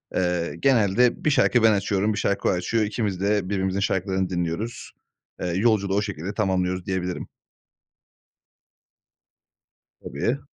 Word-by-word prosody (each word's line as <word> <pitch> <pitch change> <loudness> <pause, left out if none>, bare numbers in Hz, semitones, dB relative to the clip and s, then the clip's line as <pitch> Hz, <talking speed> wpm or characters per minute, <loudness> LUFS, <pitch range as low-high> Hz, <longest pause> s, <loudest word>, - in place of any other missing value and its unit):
Eee, 90 -2 0
genelde 120 -2 +3
1 - - +5
şarkı 125 -4 +3
ben 110 - +7
açıyorum, 100 +1 0
1 - - -5
şarkı 100 0 0
o - - +3
açıyor. 110 +5 0
İkimiz 105 -3 -2
de 100 -2 +1
birbirimizin 95 -1 -1
şarkılarını 95 -1 0
dinliyoruz. 90 +6 -3 0.5
Eee, 90 - -1
yolculuğu 100 +1 +1
o 100 - +2
şekilde 100 -2 -5
tamamlıyoruz, 95 -3 -1
diyebilirim. 90 -1 -3 2.8
Tabii. 125 +4 -2
100 Hz, 125 wpm, -24 LUFS, 90-105 Hz, 2.8 s, ben